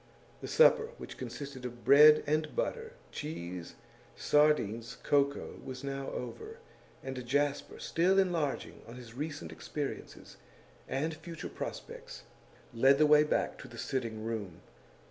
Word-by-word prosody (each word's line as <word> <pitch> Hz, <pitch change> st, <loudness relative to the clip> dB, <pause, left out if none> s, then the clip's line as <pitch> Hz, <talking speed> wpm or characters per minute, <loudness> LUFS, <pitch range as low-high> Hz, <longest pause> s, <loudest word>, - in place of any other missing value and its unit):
The -, -, -5 dB
supper 475 Hz, -1 st, +5 dB
which -, -, -9 dB
consisted 130 Hz, +2 st, -7 dB
of 120 Hz, -1 st, -7 dB
bread 150 Hz, +3 st, +8 dB
and 155 Hz, +1 st, 0 dB
butter, 465 Hz, -2 st, -2 dB, 0.2 s
cheese, 90 Hz, -, -6 dB, 0.4 s
sardines, 135 Hz, -7 st, +2 dB
cocoa 140 Hz, 0 st, +1 dB
was 130 Hz, 0 st, -7 dB
now 135 Hz, 0 st, -4 dB
over, 435 Hz, -, -6 dB, 0.5 s
and 130 Hz, -1 st, -5 dB
Jasper, 145 Hz, +3 st, 0 dB
still 180 Hz, +4 st, +2 dB
enlarging 170 Hz, -7 st, 0 dB
on 115 Hz, -, -10 dB
his 120 Hz, -3 st, -11 dB
recent 150 Hz, +3 st, -5 dB
experiences 145 Hz, -2 st, -6 dB, 0.5 s
and 155 Hz, +4 st, -1 dB
future 165 Hz, +1 st, -8 dB
prospects, -, -, -7 dB, 0.5 s
led 135 Hz, +4 st, +5 dB
the 155 Hz, -, +5 dB
way 150 Hz, 0 st, +7 dB
back 150 Hz, -, -1 dB
to -, -, -9 dB
the 120 Hz, -2 st, -12 dB
sitting 115 Hz, -4 st, -3 dB
room. 105 Hz, -7 st, -4 dB
140 Hz, 130 wpm, -32 LUFS, 125-155 Hz, 0.5 s, bread